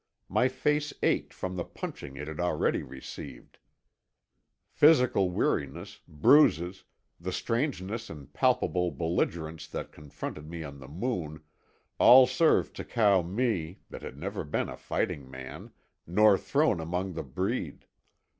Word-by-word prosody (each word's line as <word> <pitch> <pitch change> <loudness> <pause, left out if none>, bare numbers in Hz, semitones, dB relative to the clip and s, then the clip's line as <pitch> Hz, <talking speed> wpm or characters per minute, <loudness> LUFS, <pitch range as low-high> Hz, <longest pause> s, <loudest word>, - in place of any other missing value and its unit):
My 125 - +3
face 150 +3 0
ached - - +1
from 95 0 -5
the 90 - -1
punching 70 -4 -8
it 75 +1 -6
had 80 0 -7
already 90 0 +1
received; 65 0 -10 1.1
physical 125 - +4
weariness, 70 -5 -2
bruises, 90 - +4 0.3
the 90 +2 -4
strangeness 115 -2 -2
and 75 -5 -11
palpable 90 -1 +2
belligerence 80 -2 -2
that - - -6
confronted 75 0 -8
me 85 -1 -6
on 70 -2 -9
the 65 - -11
Moon, 80 - -4 0.6
all 125 +2 +9
served 130 +6 +2
to - - -4
cow 105 -5 +3
me, 95 -2 -2
that - - -8
had 65 - -8
never 100 +5 -4
been 75 - -2
a - - -6
fighting 70 -3 -3
man, 65 0 -9 0.4
nor 105 +4 +5
thrown 140 - +1
among 90 +3 -3
the 80 - -4
breed. 65 - -3
90 Hz, 135 wpm, -29 LUFS, 75-115 Hz, 1.1 s, all